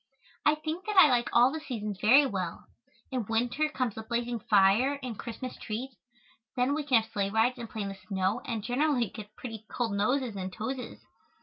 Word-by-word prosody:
I 300 - +5
think 315 +5 -5
that 420 -2 -2
I 340 -5 +9
like 245 -1 +2
all 245 +2 +5
the 315 - -4
seasons 215 -9 -5
very 265 +7 +7
well. 185 -8 -4 0.5
In 250 -6 -2
winter 245 +7 +1
comes 255 -6 -2
the 220 - -6
blazing 235 +1 -2
fire 210 +8 +4
and 245 -3 -4
Christmas 245 +3 -6
treat. 240 +5 -5 0.6
Then 255 +2 +2
we 305 - 0
can 250 -6 +4
have - - -16
sleigh 200 -1 0
rides 225 +4 +2
and 230 -2 -6
play 220 - -4
in 200 - -3
the - - -5 0.2
snow 190 +1 0
and 225 -4 -3
generally 250 -2 +1
get 215 -1 -10
pretty 225 -4 -7
cold 235 -4 -2
noses 240 +3 0
and 190 -1 -4
toses. 250 +7 -5
240 Hz, 200 wpm, -29 LUFS, 215-265 Hz, 0.6 s, I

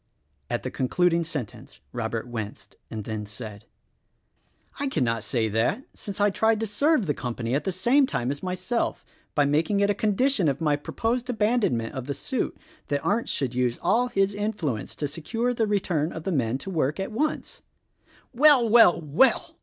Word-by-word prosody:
At - - -2
the - - -4
concluding 170 +6 +1
sentence 150 -9 -6
Robert 115 0 -3
winced' 110 -4 -7
and 110 -1 -5
then 110 0 -4
said, 105 -1 -8 1.1
"I 280 - 0
cannot 115 - 0
say 115 -4 0
that, 115 - 0
since 200 -1 -7
I 205 0 +4
tried 220 +2 +2
to - - +1
serve 250 +4 +2
the 150 - 0
com 120 -5 -4
pany 115 +1 -2
at 145 - -1
the 190 - 0
same 240 +10 +3
time 125 - -1
as 140 0 -5
myself 185 +5 -2 0.3
by 145 -2 +4
making 155 +8 +1
it 200 0 +3
a - - +2
condition 215 - +2
of 140 -1 0
my 150 -3 +2
proposed 230 - -2
abandonment 210 - +1
of 130 -1 -5
the 140 - -2
suit 260 -4 -3 0.3
that 145 -1 -2
Arndt 225 +4 +1
should 130 -3 -1
use 125 -1 0
all 245 +2 +2
his 195 -4 +1
influence 185 - -3
to 145 - -2
secure 225 - -2
the 225 -2 0
return 175 -6 0
of 160 - -7
the 190 - -2
men 125 -6 0
to 195 - -7
work 155 -1 0
at 195 +3 -3
once." 305 +8 -2 0.7
"Well! 265 -2 +6
Well!! 220 -6 +6
Well!!!" 160 - +2
170 Hz, 185 wpm, -26 LUFS, -, 1.1 s, Well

